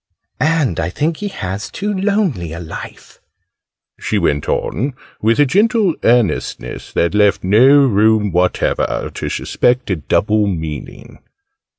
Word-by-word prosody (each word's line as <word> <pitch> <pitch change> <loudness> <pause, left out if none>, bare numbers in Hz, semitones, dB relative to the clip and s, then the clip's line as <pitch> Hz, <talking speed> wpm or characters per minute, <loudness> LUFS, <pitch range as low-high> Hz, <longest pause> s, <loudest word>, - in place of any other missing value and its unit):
" - - -50 0.2
and 130 - -1
I 80 - -1
think 155 - -2
he 210 - -4
has 100 - -5
too 210 +1 -3
lonely 190 - -1
a 85 - -6
life," 80 -2 -10 0.8
she - - -1
went 70 0 0
on, 130 - -2 0.3
with 115 +4 +2
a 145 - +6
gentle 205 - +2
earnestness 115 -8 0
that 85 +2 +1
left 105 -1 +2
no 130 +9 +5
room 110 -2 +2
whatever 90 +1 0
to - - -4
suspect 125 -3 0
a 90 - 0
double 105 +7 +1
meaning. 80 -6 -6
110 Hz, 135 wpm, -17 LUFS, 90-145 Hz, 0.8 s, a